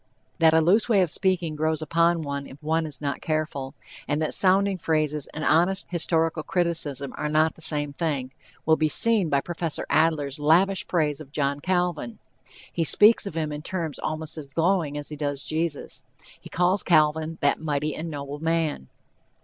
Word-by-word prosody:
That 160 Hz, -1 st, +5 dB
a 160 Hz, -, +5 dB
loose 205 Hz, +9 st, +3 dB
way 200 Hz, -5 st, +4 dB
of 170 Hz, -, -2 dB
speaking 180 Hz, -5 st, 0 dB
grows 155 Hz, 0 st, 0 dB
upon 165 Hz, +1 st, +1 dB
one 140 Hz, -1 st, -4 dB
if 135 Hz, -, -12 dB
one 160 Hz, +1 st, 0 dB
is 145 Hz, -3 st, -7 dB
not 140 Hz, -1 st, -3 dB
careful, 155 Hz, -4 st, -3 dB, 0.3 s
and 145 Hz, +1 st, 0 dB
that 155 Hz, -, -1 dB
sounding 195 Hz, 0 st, +4 dB
phrases 155 Hz, -3 st, -1 dB
and 155 Hz, -, -7 dB
honest 175 Hz, +6 st, +2 dB
historical 165 Hz, -2 st, 0 dB
criticism 155 Hz, -6 st, -1 dB
are 150 Hz, -, -2 dB
not 155 Hz, +1 st, +2 dB
the -, -, -18 dB
same 150 Hz, -2 st, 0 dB
thing, 140 Hz, -5 st, -2 dB, 0.3 s
will 160 Hz, 0 st, +4 dB
be 155 Hz, -1 st, +1 dB
seen 210 Hz, +3 st, +2 dB
by 140 Hz, -1 st, +2 dB
Prof. 170 Hz, -1 st, -3 dB
Adler's 155 Hz, -3 st, +1 dB
lavish 180 Hz, +6 st, +2 dB
praise 155 Hz, -4 st, 0 dB
of 140 Hz, -3 st, -12 dB
John 140 Hz, -1 st, -1 dB
Calvin. 175 Hz, -8 st, -1 dB, 0.6 s
He 170 Hz, -, 0 dB
speaks 210 Hz, +7 st, +5 dB
of 165 Hz, -, -7 dB
him 155 Hz, -2 st, -2 dB
in 150 Hz, 0 st, -5 dB
terms 165 Hz, -3 st, -4 dB
almost 155 Hz, 0 st, -4 dB
as 145 Hz, -, -9 dB
glowing 165 Hz, 0 st, 0 dB
as 145 Hz, -, -5 dB
he 150 Hz, -, -6 dB
does 145 Hz, -2 st, -3 dB
of -, -, -5 dB
Jesus. 160 Hz, -1 st, -3 dB, 0.4 s
He -, -, -13 dB
calls 180 Hz, +2 st, +1 dB
Calvin 155 Hz, 0 st, +2 dB
"that 145 Hz, +1 st, +1 dB
mighty 150 Hz, -1 st, -1 dB
and 165 Hz, +2 st, -5 dB
noble 145 Hz, -1 st, -6 dB
man." 160 Hz, -, -1 dB
155 Hz, 185 wpm, -25 LUFS, 145-170 Hz, 0.6 s, That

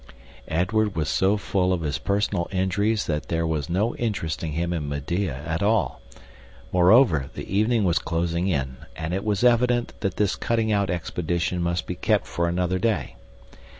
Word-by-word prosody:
Edward 95 Hz, +5 st, +1 dB
was 80 Hz, -1 st, -1 dB
so 95 Hz, +2 st, +2 dB
full 95 Hz, -2 st, 0 dB
of 90 Hz, -2 st, 0 dB
his 75 Hz, -2 st, -2 dB
personal 100 Hz, -3 st, 0 dB
injuries 100 Hz, +3 st, +1 dB
that 75 Hz, -1 st, -2 dB
there 85 Hz, -1 st, 0 dB
was 80 Hz, -3 st, -2 dB
no 105 Hz, +7 st, 0 dB
interesting 85 Hz, -8 st, -2 dB
him 85 Hz, +2 st, -1 dB
in 75 Hz, -4 st, -3 dB
Medea 75 Hz, 0 st, -2 dB
at 80 Hz, +1 st, -2 dB
all. 110 Hz, +3 st, +1 dB, 0.7 s
Moreover, 90 Hz, -, +5 dB
the -, -, -6 dB
evening 110 Hz, +2 st, +3 dB
was 90 Hz, -3 st, +2 dB
closing 85 Hz, +2 st, -1 dB
in, 65 Hz, -8 st, -1 dB, 0.2 s
and 80 Hz, +2 st, -4 dB
it 95 Hz, -, -1 dB
was 105 Hz, -1 st, 0 dB
evident 120 Hz, 0 st, +3 dB
that 100 Hz, -3 st, -2 dB
this 105 Hz, -2 st, +1 dB
cutting 115 Hz, -2 st, 0 dB
out 100 Hz, -2 st, +1 dB
expedition 85 Hz, +1 st, -2 dB
must 85 Hz, 0 st, -1 dB
be -, -, -3 dB
kept -, -, +1 dB
for 85 Hz, 0 st, -1 dB
another 90 Hz, +1 st, 0 dB
day. 115 Hz, -1 st, -1 dB
90 Hz, 170 wpm, -24 LUFS, 80-105 Hz, 0.7 s, Moreover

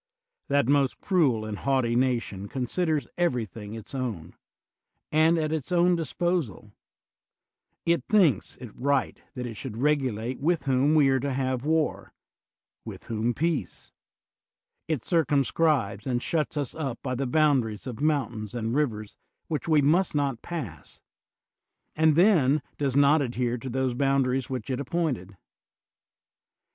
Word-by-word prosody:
That 140 Hz, -3 st, +2 dB
most 140 Hz, -1 st, +2 dB
cruel 140 Hz, -, +1 dB
and 105 Hz, -2 st, -5 dB
haughty 130 Hz, -4 st, +1 dB
nation 120 Hz, -6 st, 0 dB
considers 145 Hz, -, -1 dB
everything 115 Hz, -, -2 dB
its 110 Hz, +3 st, -10 dB
own, 120 Hz, -, -4 dB, 0.8 s
and 160 Hz, +2 st, +4 dB
at 155 Hz, -1 st, -1 dB
its 160 Hz, +1 st, -3 dB
own 175 Hz, 0 st, +4 dB
disposal; 170 Hz, -, -2 dB, 1.1 s
it 170 Hz, -5 st, +2 dB
thinks 175 Hz, -, +3 dB
it 120 Hz, -4 st, -9 dB
right 140 Hz, +1 st, 0 dB
that 125 Hz, -1 st, -4 dB
it 120 Hz, -, -5 dB
should 110 Hz, 0 st, -7 dB
regulate 130 Hz, -4 st, 0 dB
with 160 Hz, -1 st, 0 dB
whom 135 Hz, +3 st, +3 dB
we 145 Hz, -3 st, +5 dB
are 135 Hz, 0 st, +2 dB
to 140 Hz, +2 st, -2 dB
have 130 Hz, 0 st, -2 dB
war, 160 Hz, 0 st, 0 dB, 0.7 s
with -, -, -9 dB
whom 115 Hz, +1 st, -2 dB
peace; 160 Hz, -, -2 dB, 1.0 s
it 155 Hz, -7 st, -2 dB
cir 170 Hz, -3 st, +3 dB
cumscribes 140 Hz, -7 st, +1 dB
and 125 Hz, -1 st, -1 dB
shuts 155 Hz, -2 st, -1 dB
us 140 Hz, -4 st, -2 dB
up 135 Hz, -7 st, -4 dB
by 130 Hz, -, -2 dB
the 130 Hz, +1 st, -2 dB
boundaries 130 Hz, -7 st, +1 dB
of 125 Hz, -2 st, -6 dB
mountains 125 Hz, -8 st, -1 dB
and 115 Hz, -1 st, -2 dB
rivers 110 Hz, -8 st, -1 dB, 0.3 s
which 155 Hz, 0 st, -3 dB
we 155 Hz, -3 st, +4 dB
must 165 Hz, +4 st, +2 dB
not 140 Hz, -5 st, 0 dB
pass, 125 Hz, -, -7 dB, 1.0 s
and 155 Hz, -1 st, +4 dB
then 155 Hz, -7 st, +4 dB, 0.2 s
does 135 Hz, -3 st, 0 dB
not 145 Hz, +2 st, +5 dB
adhere 125 Hz, -2 st, -1 dB
to 130 Hz, -, -6 dB
those 130 Hz, 0 st, 0 dB
boundaries 135 Hz, 0 st, +1 dB
which 130 Hz, +1 st, -4 dB
it 130 Hz, -, -2 dB
appointed. 135 Hz, -, -2 dB
135 Hz, 140 wpm, -26 LUFS, 120-155 Hz, 1.1 s, we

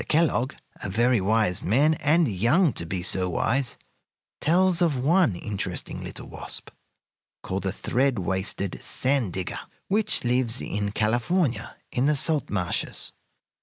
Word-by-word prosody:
Kellogg, 155 Hz, -4 st, +2 dB, 0.2 s
a -, -, -5 dB
very 120 Hz, +3 st, +2 dB
wise 105 Hz, -2 st, +2 dB
man, 140 Hz, -, +3 dB
and 155 Hz, +2 st, +3 dB
young 120 Hz, -, +3 dB
to 85 Hz, -, -3 dB
be 90 Hz, +1 st, -3 dB
so 90 Hz, 0 st, 0 dB
wise, 125 Hz, +8 st, 0 dB, 0.6 s
tells 180 Hz, +2 st, +3 dB
of 160 Hz, -6 st, +2 dB
one 155 Hz, -, +3 dB
interesting 100 Hz, +2 st, -4 dB
little -, -, -7 dB
wasp, -, -, -7 dB, 0.7 s
called 95 Hz, +1 st, -3 dB
the 95 Hz, -, -1 dB
thread 130 Hz, +5 st, 0 dB
waisted 95 Hz, 0 st, -1 dB
sand 130 Hz, -7 st, 0 dB
digger, 95 Hz, 0 st, -3 dB, 0.3 s
which 210 Hz, +2 st, +2 dB
lives 125 Hz, 0 st, +1 dB
in 100 Hz, 0 st, -2 dB
California 120 Hz, -, 0 dB, 0.2 s
in 125 Hz, +3 st, +1 dB
the 150 Hz, -, +3 dB
salt 150 Hz, 0 st, +1 dB
marshes. 90 Hz, -4 st, -2 dB
120 Hz, 135 wpm, -25 LUFS, 100-150 Hz, 0.7 s, man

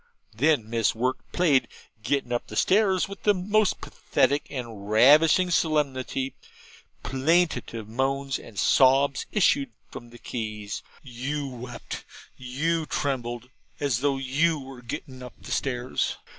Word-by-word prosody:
Then 125 Hz, -1 st, +2 dB
Miss 115 Hz, -1 st, +1 dB
Wirt 125 Hz, +3 st, 0 dB
played 155 Hz, -7 st, +3 dB
the -, -, -37 dB, 0.4 s
'Gettin' 140 Hz, -4 st, 0 dB
up 120 Hz, -, -2 dB
Stairs' 190 Hz, -2 st, +3 dB
with 195 Hz, -1 st, -9 dB
the 205 Hz, -1 st, +3 dB
most 205 Hz, +2 st, +1 dB
pathetic 140 Hz, +1 st, 0 dB
and 115 Hz, -6 st, -7 dB
ravishing 150 Hz, -, +6 dB
solemnity: 135 Hz, -5 st, 0 dB, 0.7 s
plaintive 135 Hz, -6 st, 0 dB
moans 135 Hz, +3 st, -1 dB
and 105 Hz, -, -13 dB
sobs 135 Hz, +3 st, +4 dB
issued 145 Hz, -, +3 dB, 0.2 s
from 120 Hz, -, -9 dB
the 120 Hz, -, -13 dB
keys 110 Hz, -4 st, -5 dB, 0.2 s
you 140 Hz, +3 st, -4 dB
wept 125 Hz, -1 st, -7 dB, 0.4 s
and 155 Hz, +6 st, -1 dB
trembled 125 Hz, -3 st, -3 dB, 0.3 s
as 135 Hz, -5 st, 0 dB
you 140 Hz, +3 st, +1 dB
were 135 Hz, -2 st, -10 dB
gettin' 130 Hz, +2 st, -7 dB
up 125 Hz, -1 st, -9 dB
stairs. 125 Hz, -2 st, -1 dB
135 Hz, 120 wpm, -26 LUFS, 120-150 Hz, 0.7 s, ravishing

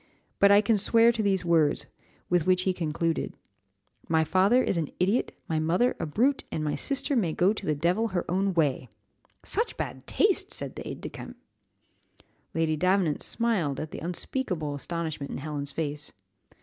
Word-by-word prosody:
But 200 Hz, -, +6 dB
I 200 Hz, +1 st, +7 dB
can 215 Hz, 0 st, +2 dB
swear 230 Hz, +3 st, +5 dB
to 225 Hz, -, -2 dB
these 195 Hz, -3 st, 0 dB
words, 165 Hz, -3 st, +2 dB, 0.4 s
with 175 Hz, -2 st, +1 dB
which 185 Hz, 0 st, +3 dB
he 185 Hz, -, +1 dB
concluded 165 Hz, -1 st, -2 dB, 0.7 s
'My 160 Hz, -1 st, +3 dB
father 195 Hz, -, +3 dB
is -, -, 0 dB
an 160 Hz, -4 st, -1 dB
idiot, 195 Hz, +7 st, +1 dB, 0.2 s
my 160 Hz, -1 st, 0 dB
mother 175 Hz, +10 st, +1 dB
a -, -, -2 dB
brute, 255 Hz, -, +1 dB
and 155 Hz, -, -2 dB
my 150 Hz, -, -1 dB
sister 280 Hz, 0 st, 0 dB
may 180 Hz, -10 st, +1 dB
go 185 Hz, +6 st, +3 dB
to 210 Hz, -, -7 dB
the 150 Hz, -, +1 dB
devil 175 Hz, +9 st, +1 dB
her 185 Hz, -5 st, -2 dB
own 190 Hz, +1 st, 0 dB
way.'" 140 Hz, -6 st, 0 dB, 0.5 s
"Such 455 Hz, +3 st, -1 dB
bad -, -, -5 dB
taste!" 410 Hz, 0 st, +1 dB
said -, -, +3 dB
the -, -, -7 dB
aid -, -, -7 dB
de -, -, -5 dB
camp. -, -, -10 dB, 1.2 s
Lady 165 Hz, -1 st, +1 dB
Davenant 180 Hz, -1 st, +1 dB
smiled 195 Hz, -, 0 dB
at 155 Hz, -, -5 dB
the -, -, -6 dB
unspeakable 175 Hz, -, -3 dB
astonishment 155 Hz, -1 st, -4 dB
in -, -, -4 dB
Helen's 145 Hz, 0 st, -4 dB
face. 150 Hz, -1 st, -4 dB
175 Hz, 175 wpm, -27 LUFS, 155-210 Hz, 1.2 s, I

